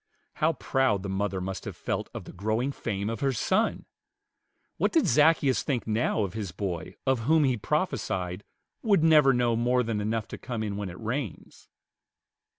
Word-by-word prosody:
How 160 +2 +2
proud 130 -9 +1
the 100 - -4
mother 95 0 -1
must 95 +1 -4
have - - -6
felt - - -3
of - - -7
the - - -11
growing 110 +8 -1
fame 100 -6 -3
of 115 -1 -3
her 135 - +1
son! 190 - 0 0.9
What - - +1
did 325 -4 +3
Zaccheus 150 -3 +4
think 130 -5 -2
now 110 0 +1
of 95 -3 -3
his 105 -5 -4
boy 90 -1 -4
of 130 -4 +1
whom 160 -1 +5
he 130 -3 +2
prophesied 90 -3 -2 0.4
"would 200 -8 +3
never 155 -4 +6
know 120 -2 +2
more 125 +2 +2
than 110 -2 -2
enough 110 +1 -1
to - - -7
come 120 -3 -4
in 105 -2 -3
when 100 -2 -4
it 90 - -10
rains"? 115 - -5
115 Hz, 180 wpm, -28 LUFS, 100-135 Hz, 0.9 s, never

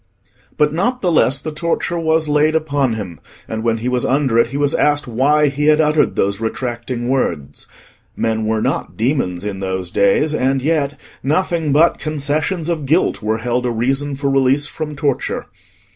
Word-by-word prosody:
But 150 -1 +2
not 245 +10 0
the 180 - +1
less 135 -4 +3
the 155 - -5
torture 170 +2 -2
was 160 -1 +1
laid 150 +1 +2
upon 145 -5 +1
him, 100 -6 -6 0.3
and 110 0 -4
when 115 0 +1
he 115 +2 -4
was 125 -1 0
under 135 -4 +2
it 115 - +4
he 135 +4 -5
was 145 -1 +1
asked 145 0 +2
why 140 +6 +2
he 145 +2 -2
had 155 0 +5
uttered 150 -1 +2
those 100 +2 0
retracting 120 +1 -3
words. 85 - -2 0.5
Men 110 -1 -1
were 110 0 0
not - - -2
demons 110 -7 -1
in 100 -2 -4
those 95 -2 -3
days, 100 +12 +2
and 135 -1 +1
yet 145 0 -1 0.2
nothing 160 +1 0
but 160 +4 +4
concessions 155 +3 -2
of 160 -5 -2
guilt 160 +6 +2
were 110 +1 0
held 120 +2 -1
a 125 - 0
reason 135 +5 -1
for 140 0 -1
release 135 +1 +2
from 150 0 -5
torture. 140 -2 -1
140 Hz, 180 wpm, -18 LUFS, 115-150 Hz, 0.5 s, had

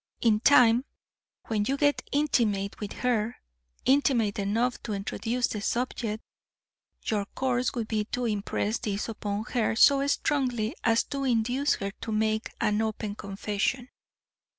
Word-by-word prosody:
In 220 -3 +3
time, 245 -1 +6 0.6
when 210 -2 0
you 275 - 0
get 290 0 +2
intimate 220 -9 +1
with 205 -2 -5
her, 235 -2 0 0.5
intimate 255 -7 +3
enough 225 +5 0
to 220 - -4
introduce 230 +5 -1
the 210 - -3
subject, 230 -2 -2 0.8
your 210 -2 0
course 255 0 0
would 230 -3 -2
be 215 -2 -1
to 245 +3 -3
impress 210 0 -1
this 205 -1 -2
upon 210 -2 -3
her 230 -3 +1
so 275 +4 +5
strongly 255 -4 0
as 225 0 +3
to 275 -1 -4
induce 250 +3 +1
her 200 0 -4
to 225 - -4
make 220 +1 0
an 210 +1 +1
open 220 -1 -2
confession. 205 +5 -2
225 Hz, 140 wpm, -28 LUFS, 210-250 Hz, 0.8 s, time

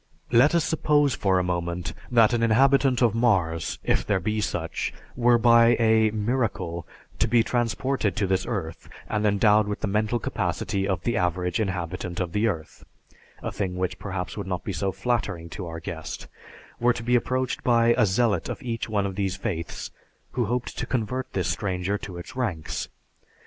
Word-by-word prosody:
Let 130 +7 +5
us 170 - +3
suppose 145 -3 +2
for 95 -4 +1
a 90 - +2
moment 85 -1 -2 0.2
that 120 -1 +5
an 120 - +1
inhabitant 130 +2 +4
of 115 -3 +4
Mars, 95 -9 +1
if - - +1
there 100 -2 +1
be 105 +4 -1
such, 85 -5 -2 0.2
were 120 -1 +4
by 115 0 +6
a 110 -1 +4
"miracle" 105 - -2 0.3
to - - +3
be 120 -1 +4
transported 120 -1 0
to 105 - +1
this 95 0 0
earth 90 -9 -4 0.2
and 105 - -1
endowed 105 +1 +4
with 105 - -4
the - - 0
mental 105 +3 +1
capacity 95 -3 -2
of 95 -3 -1
the 120 -1 0
average 90 +3 0
inhabitant 90 -3 -3
of 90 -2 -2
the 105 +5 +1
earth 80 -8 -4 0.6
(a - - -2
thing 95 -3 -3
which 90 0 -2
perhaps 90 -5 -4
would 100 -2 -5
not 90 -2 -3
be 100 - -3
so 95 +2 -1
flattering 95 -7 -2
to 90 +2 -6
our 80 0 -6
guest), 80 -1 -6 0.5
were 120 +1 +4
to 115 - -6
be 125 +1 +2
approached 130 +1 0
by 120 -1 +4
a 105 - +3
zealot 100 -2 +1
of - - -5
each 115 -2 -3
one 105 -2 +1
of 100 - -3
these 95 -1 -1
faiths, 90 -5 -4 0.4
who 120 -2 0
hoped 120 +3 -2
to - - -3
convert 125 +1 -2
this 95 - 0
stranger 95 0 -1
to 90 -3 -8
its 85 +9 -9
ranks. 100 -12 -3
105 Hz, 185 wpm, -25 LUFS, 90-120 Hz, 0.6 s, by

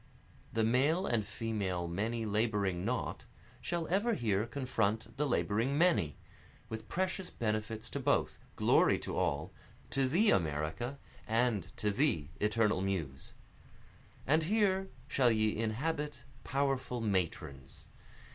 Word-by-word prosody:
The 115 - +1
male 140 - +3
and 115 - +1
female 105 -5 -2
many 110 +6 -2
laboring 105 -4 0
not, 125 +4 -2 0.4
Shall 170 -2 -2
ever 205 +6 +2
here 105 -1 0
confront 115 -5 -1
the 150 +1 +1
laboring 120 +2 +1
many, 105 - +3 0.5
With 110 0 -6
precious 185 0 -1
benefits 110 0 -2
to - - -3
both, - - +1 0.2
glory - - +4
to - - -5
all, 70 +2 -1 0.4
To 135 +2 +2
thee 200 +10 +4
America, 80 - -1 0.3
and 115 -4 +2 0.2
thee 105 - +1
eternal 105 -2 +2
Muse. 80 -9 -3 0.9
And 155 +4 +4
here 195 -1 +2 0.2
shall 125 -3 +3
ye 110 -1 +2
inhabit 135 +5 -2 0.2
powerful 135 -2 0
Matrons! 85 - -2
115 Hz, 120 wpm, -33 LUFS, 100-140 Hz, 0.9 s, glory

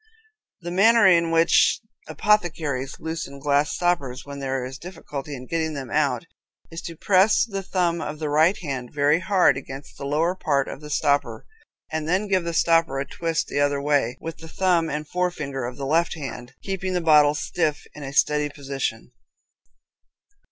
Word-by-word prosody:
The 175 0 -5
manner 220 +4 +5
in 170 -3 +5
which 165 0 +4 0.3
apothecaries 155 -10 0
loosen 160 -4 -5
glass 145 +1 +1
stoppers 145 -8 -1
when 140 0 -8
there 135 -2 -2
is 130 +1 -8
difficulty 150 -5 -7
in 130 -1 -9
getting 160 +1 -2
them 135 -4 -6
out - - +1 0.5
is 165 - -6
to 165 - -7
press 190 +6 +3
the 195 -4 -4
thumb 175 -3 0
of 150 0 -5
the 155 0 -3
right 155 +6 +3
hand 130 -5 -4
very 145 +2 +2
hard 180 -5 +3
against 135 +1 -9
the 140 - -5
lower 160 +5 +1
part 140 -7 0
of - - -7
the 150 - -9
stopper, 140 -6 0 0.5
and 160 0 -3
then 190 +4 +1
give 190 -3 +1
the 170 - -1
stopper 165 -5 +3
a 135 - -2
twist 165 +3 -2
the - - -3
other 145 0 +2
way, 140 -4 +1
with 165 -1 -7
the 160 - -10
thumb 175 -2 +1
and 150 +1 -4
forefinger 150 -8 -2
of 125 +1 -6
the 140 - -4
left 165 +4 +1
hand, 130 -5 -7
keeping 190 -1 -3
the 180 - +1
bottle 150 -2 +5
stiff 150 0 -1
in 150 - -11
a 135 -1 -6
steady 150 +1 +2
position. 135 -5 -4
150 Hz, 180 wpm, -24 LUFS, 140-170 Hz, 0.5 s, manner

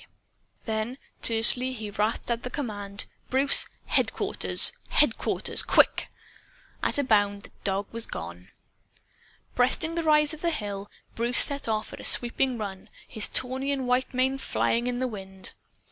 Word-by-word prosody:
Then, 220 +3 -4 0.2
tersely, 240 +3 +6
he 215 -4 -7
rasped 215 +3 -2
out 235 0 -2
the 250 - -6
command 205 -7 -4 0.2
"Bruce! 270 +2 +3 0.2
Headquarters! - - +2 0.2
Headquarters! - - +3
QUICK!" - - +2 0.7
At - - 0
a 285 - +1
bound, 205 -4 +1
the - - -13
dog 195 0 -2
was 230 0 -3
gone. 85 +2 -9 1.0
Breasting 295 +7 0
the 335 - -2
rise 300 -1 +3
of 310 - -10
the 340 - 0
hill, 205 -8 -5 0.2
Bruce 235 +2 +3
set 280 -3 +2
off 215 -1 -3
at - - -10
a - - -10
sweeping 245 +1 +2
run, 195 -3 -8 0.2
his 220 - +3
tawny 260 +2 -1
and 265 -2 -3
white 250 +1 0
mane 265 +1 -1
flying 235 -2 -1
in 245 0 -3
the 255 +1 -2
wind. 190 -4 -7
235 Hz, 150 wpm, -25 LUFS, 205-260 Hz, 1.0 s, tersely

